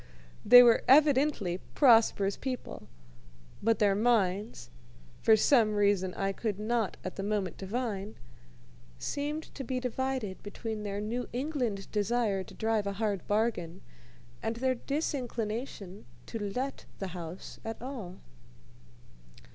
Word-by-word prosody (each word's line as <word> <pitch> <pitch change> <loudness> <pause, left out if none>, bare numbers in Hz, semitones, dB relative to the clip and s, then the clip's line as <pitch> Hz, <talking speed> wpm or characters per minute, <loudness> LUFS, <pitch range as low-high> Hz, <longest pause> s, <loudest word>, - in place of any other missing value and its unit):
They 245 +3 +10
were 235 -2 +5
evidently 275 - +4 0.2
prosperous 225 -6 +5
people, 255 -2 -6 0.7
but 225 +1 +2
their 205 -2 +3
minds 205 - 0 0.5
for 220 - +6
some 220 -1 +4
reason 200 -3 +2
I 195 0 -1
could 205 0 -3
not 220 -1 -1
at - - -6
the - - -2
moment 200 -4 -2
divine 210 0 -3 0.8
seemed 295 - -4
to 270 - -6
be 255 0 -2
divided 255 -5 -3
between 215 +1 -5
their 205 -1 -3
New 235 +4 -3
England 245 -7 -2
desire 210 -2 0
to - - -13
drive 220 -2 0
a 200 - -2
hard 200 -2 -2
bargain 205 -5 -1 0.6
and 225 +1 -2
their 260 +2 +1
disinclination 235 - -4 0.2
to 225 - -6
let 260 +6 -4
the 195 - -4
house 175 0 -8
at 225 0 -5
all. 235 -8 -7
220 Hz, 125 wpm, -30 LUFS, 200-250 Hz, 0.8 s, They